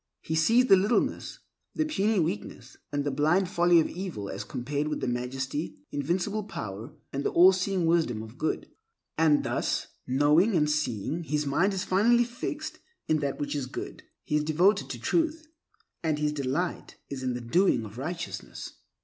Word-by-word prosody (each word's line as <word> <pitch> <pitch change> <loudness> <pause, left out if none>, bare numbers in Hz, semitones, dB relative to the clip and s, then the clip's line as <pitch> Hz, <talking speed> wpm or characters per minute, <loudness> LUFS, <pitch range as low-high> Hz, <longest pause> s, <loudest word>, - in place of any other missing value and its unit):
He 160 - -3
sees 225 +11 +4
the 195 - +7
littleness, 200 +5 0 0.4
the 310 - +1
puny 220 -8 +1
weakness, 105 - -3
the 145 0 -1
blind 160 +7 +2
folly 175 -1 +4
of 160 - +2
evil 170 - -5
as - - -5
compared 145 +4 -3
with 150 - -2
the - - -2
majesty, 130 +5 -3
the - - -5
invincible 185 +8 -1
power, 115 - -7 0.2
and 140 +1 -2
the - - +1
all 180 +2 +7
seeing 185 -1 0
wisdom 160 -10 +1
of 110 +6 -12
Good. 155 - -1 0.5
And 155 -2 +4
thus, - - -1 0.2
knowing 150 - +4
and 150 -2 +3
seeing, 150 - -1
his 150 -1 -1
mind 175 +8 +2
is 185 - -1
finally 230 +6 +4
fixed 245 +6 -5 0.3
in 155 - +2
that 140 -2 -2
which 145 - -2
is 140 -3 -2
good. - - -7 0.2
He 150 - -1
is 150 - 0
devoted 170 +7 +2
to - - -5
Truth, 325 -1 0 0.5
and 155 -2 0
his 150 0 0
delight 145 +5 -2 0.2
is 135 -2 -4
in 130 -1 -1
the - - -3
doing 120 - +2
of 105 +3 -9
righteousness. 170 +5 -5
155 Hz, 175 wpm, -28 LUFS, 140-190 Hz, 0.5 s, the